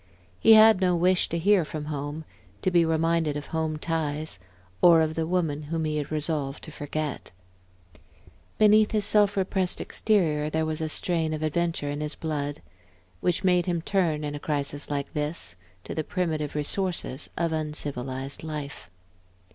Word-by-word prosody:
He 225 - +7
had 220 -2 +7
no 180 -1 +3
wish 180 +2 +2
to 170 - -1
hear 195 +2 +4
from 150 -1 -6
home, 150 +1 -5 0.4
to 185 - +2
be 175 -1 +5
reminded 160 -1 +1
of 145 - -6
home 160 -1 -1
ties, 155 - -3 0.4
or 170 -2 +7
of 160 0 +1
the 160 0 -2
woman 165 -5 0
whom 165 -1 -1
he 155 0 -1
had 150 0 -4
resolved 150 -2 -2
to 155 - -8
forget. 150 0 -4 1.3
Beneath 215 0 +5
his 210 -2 +2
self 205 -1 +4
repressed 190 -1 +1
exterior 155 -9 +1
there 160 +1 0
was 155 0 -2
a 160 - -1
strain 160 -1 -1
of 155 - -5
adventure 160 -2 -1
in 145 +1 -4
his 150 0 -3
blood, 145 -2 -4 0.6
which 175 - 0
made 180 -1 +3
him 170 -2 -1
turn, 170 -7 0
in 145 -1 -3
a 145 - -5
crisis 145 -1 -2
like 140 -1 -3
this, 150 - -3 0.3
to - - -6
the 155 - -2
primitive 155 -4 -2
resources 155 -2 -1
of 170 -1 0
uncivilized 140 -3 -4
life. 150 - -6
155 Hz, 165 wpm, -26 LUFS, 150-175 Hz, 1.3 s, He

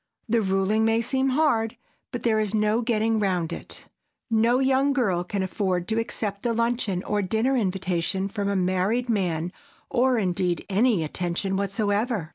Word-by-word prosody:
The 230 0 +2
ruling 195 +2 +1
may 225 0 +3
seem 265 +2 +1
hard, 255 -5 +1 0.3
but 245 -3 -5
there 220 -2 +2
is 215 0 -1
no 215 +2 +2
getting 225 -1 +1
round 180 -5 0
it. - - -8 0.4
No 230 +2 +3
young 270 +1 +2
girl 195 -10 +1
can 190 +2 -2
afford 185 -2 -1
to 220 +1 +1
accept 210 -3 -3
a 235 - +1
luncheon 230 -5 0
or 210 0 0
dinner 220 +7 +1
invitation 190 -3 -1
from 200 0 -2
a 200 - 0
married 190 +7 0
man 180 -5 -1 0.4
or, 255 0 +3
indeed, 180 -3 0
any 210 -3 +3
attention 175 +4 -2
whatsoever. 205 -1 -1
210 Hz, 160 wpm, -25 LUFS, 190-230 Hz, 0.4 s, may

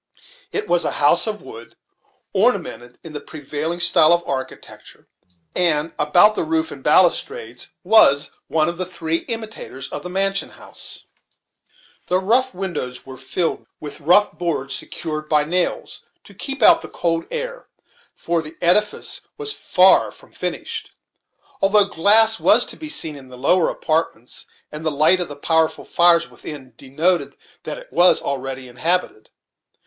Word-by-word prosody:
It 425 - -3
was 175 0 +2
a - - -2
house 145 +8 +2
of 210 -1 -4
wood, 115 +1 -12 0.6
ornamented 120 0 -1
in 165 - -10
the 150 - -4
prevailing 155 +3 -5
style 175 -2 +5
of 175 0 +1
architecture, 130 -1 -7 0.5
and 165 -2 +2
about 175 +8 +5
the - - -2
roof 320 0 -1
and - - -10
balustrades 460 +2 +1
was 145 -11 +4 0.2
one 155 -1 +1
of 170 +1 -4
the 185 - -1
three 165 -3 -2
imitators 220 - -6
of - - -6
the 180 - -8
mansion 195 +1 -1
house. - - -11 1.0
The 180 - +1
upper 240 +4 +1
windows 160 -10 -5
were 135 -1 -10
filled 135 +6 -3
with 145 -2 -8
rough 180 +7 +4
boards 155 -5 -3
secured 155 -1 -5
by 150 -1 +3
nails, 175 +4 -2 0.2
to - - -16
keep 275 -3 -2
out - - +7
the - - -10
cold 165 -1 -2
air - - -6 0.5
for 170 -1 -2
the 155 +1 -11
edifice 210 +5 +1 0.2
was 435 -1 -2
far - - +4
from - - -18
finished, 450 -2 -5 0.7
although 200 +1 +5
glass 215 +4 +4
was 240 +3 +5
to - - -6
be 310 - -8
seen 160 - 0
in 135 -2 -12
the 125 0 -13
lower 165 +7 +2
apartments, 155 -6 -3 0.2
and 150 +1 -7
the 160 - +1
light 155 +5 +4
of 175 - -2
the 145 - -8
powerful 160 +2 0
fires 170 -1 +3
within 135 -5 -11
de 130 - -13
noted 170 +6 0 0.3
that - - -5
it - - -14
was 180 +1 +4
already 135 -1 -5
inhabited. 155 -1 -2
170 Hz, 155 wpm, -20 LUFS, 150-200 Hz, 1.0 s, out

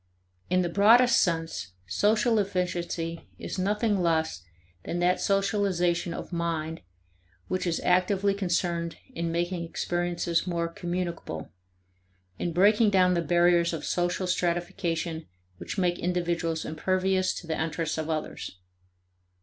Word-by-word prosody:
In 185 0 +3
the - - 0
broadest 230 +7 +5
sense, 165 - -1
social 215 - +2
efficiency 175 -3 -2
is - - -5
nothing 205 +1 +1
less 160 - +1 0.4
than 175 - -3
that 175 +1 +2
socialization 195 -4 +1
of 170 - -6
mind 165 -1 -2 0.7
which 185 0 -1
is 165 - 0
actively 190 +2 +2
concerned 175 -3 -1 0.2
in 170 0 -2
making 175 +1 -1
experiences 175 0 -1
more 170 -1 0
communicable; 170 - -4 0.9
in 175 - -1
breaking 210 +5 +5
down 185 -2 +4
the 170 - +1
barriers 175 +1 +3
of 160 - -4
social 175 +1 0
stratification 170 -2 -1 0.3
which - - -6
make 175 -2 +1
individuals 170 -2 -1
impervious 185 +4 +1
to - - -7
the 160 -1 -2
interests 160 0 -2
of 160 0 -3
others. 155 -10 -4
175 Hz, 125 wpm, -27 LUFS, 170-185 Hz, 0.9 s, broadest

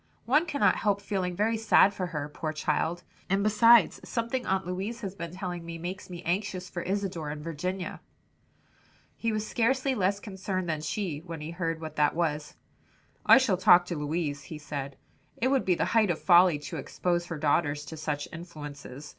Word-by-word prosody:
One 300 +8 +3
cannot 285 -3 +2
help 205 -2 +1
feeling 190 -3 -2
very 220 +4 +1
sad 215 -2 +5
for 185 -2 -3
her, 150 -4 -4
poor 155 +1 -4
child! 160 +2 -1 0.3
and 195 +1 +2
besides 230 +2 +5
something 235 +2 -2
Aunt 190 -1 0
Louise 195 +6 -4
has 195 -3 -4
been 170 -4 -6
telling 180 -2 -5
me, 165 0 -6
makes 180 +4 -6
me 175 -1 -8
anxious 185 +1 -2
for 175 - -4
Isadore 185 -5 -2
and 150 0 -6
Virginia." 180 +4 -4 1.1
He 230 - -1
was 215 0 -2
scarcely 260 +3 +1
less 200 -3 +1
concerned 190 -2 -4
than 155 -2 -1
she, 155 0 -3
when 165 0 -8
he 155 +2 -6
heard 165 -2 -2
what 160 -1 -7
that 150 0 +3
was. 155 -3 -1 0.7
"I - - +10
shall 250 -8 +2
talk 180 -2 +6
to 175 - -4
Louise," 150 -2 -2
he 155 - -7
said, 140 -2 -6 0.4
"it 255 - +1
would 270 -1 +2
be 180 - +3
the - - 0
height 220 -3 +4
of 170 - +1
folly 175 -3 +6
to 145 -1 -7
expose 175 -1 -1
her 165 - -4
girls 145 0 +1
to 160 - -8
such 150 -2 -3
influences. 145 -4 -9
180 Hz, 190 wpm, -28 LUFS, 155-200 Hz, 1.1 s, I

